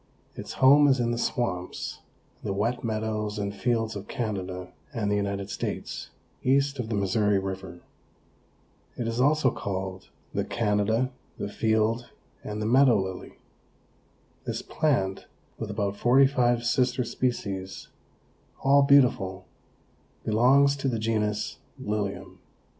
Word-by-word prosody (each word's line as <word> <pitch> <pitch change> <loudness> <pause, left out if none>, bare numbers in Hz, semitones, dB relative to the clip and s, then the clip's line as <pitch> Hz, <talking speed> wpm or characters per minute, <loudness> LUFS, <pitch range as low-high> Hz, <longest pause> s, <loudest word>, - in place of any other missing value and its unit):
Its - - -7
home 145 +2 +6
is 135 -2 +3
in 120 -1 +1
the 120 - -1
swamps, 90 -8 -2 0.4
the 100 - -2
wet 115 +5 -1
meadows 110 -1 -2
and 100 -1 -2
fields 115 0 0
of 100 0 -7
Canada 95 -7 -4 0.2
and 110 -7 -1
the - - +2
United 100 -1 -2
States, - - -4 0.3
east 140 +1 +2
of 115 -3 -3
the 115 - -1
Missouri 100 +1 +2
river. 95 -2 -5 1.2
It 120 - -2
is 115 +2 -1
also 145 -1 +3
called 95 -1 -5 0.2
the - - 0
Canada, 110 +3 +1 0.3
the - - -4
Field 110 +2 +1 0.3
and 105 0 -5
the 105 - -2
Meadow 125 0 +5
Lily. 95 -1 -5 1.1
This - - -3
plant, 100 -11 0 0.3
with - - -4
about 100 -1 -1
forty 130 +5 +5
five 120 -3 +2
sister 125 +1 +2
species 105 -6 -3 0.7
all 140 +1 +6
beautiful, 120 -10 +3 0.8
belongs 135 +6 +4
to 140 - -2
the 120 -3 0
genus 105 -1 -1 0.2
Lilium. 105 -1 -4
110 Hz, 130 wpm, -27 LUFS, 100-125 Hz, 1.2 s, home